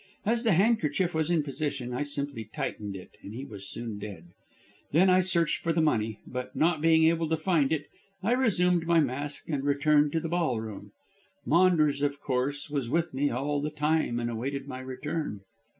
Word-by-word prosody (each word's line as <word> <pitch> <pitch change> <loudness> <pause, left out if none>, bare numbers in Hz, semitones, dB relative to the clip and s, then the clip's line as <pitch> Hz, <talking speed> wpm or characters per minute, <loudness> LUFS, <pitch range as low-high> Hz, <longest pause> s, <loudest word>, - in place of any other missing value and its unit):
As 230 +3 +1
the 225 -4 +4
handkerchief 185 -3 +2
was 160 0 0
in 170 -3 +2
position 140 -3 -3
I 125 - -2
simply 145 -5 -3
tightened 105 -2 -4
it, 95 - -10
and 105 - -9
he 130 +3 -5
was 100 -6 -8
soon 115 -3 -5
dead. 95 -5 -8 0.6
Then 185 +4 +5
I 185 0 +5
searched 170 -3 +1
for 165 - 0
the 165 - +1
money, 110 -9 +1
but, 125 0 -6
not 160 -1 +2
being 160 0 +5
able 165 0 +3
to 160 - +1
find 160 -4 +2
it, 150 -2 0 0.4
I 215 - +1
resumed 180 -9 +2
my 170 -1 +5
mask 145 0 -2
and 145 -4 -2
returned 145 +1 +3
to 165 - +2
the 165 - -4
ballroom. 125 - -2 0.5
Maunders, 155 -4 +4
of 145 -1 0
course, 140 +2 -1
was 140 -5 -2
with 165 +3 0
me 140 +2 +1
all 145 +4 -1
the 150 - -1
time, 150 -4 0
and 120 0 -2
awaited 135 +4 -4
my 130 -2 -6
return." 130 -2 -4
145 Hz, 190 wpm, -28 LUFS, 130-165 Hz, 0.6 s, Then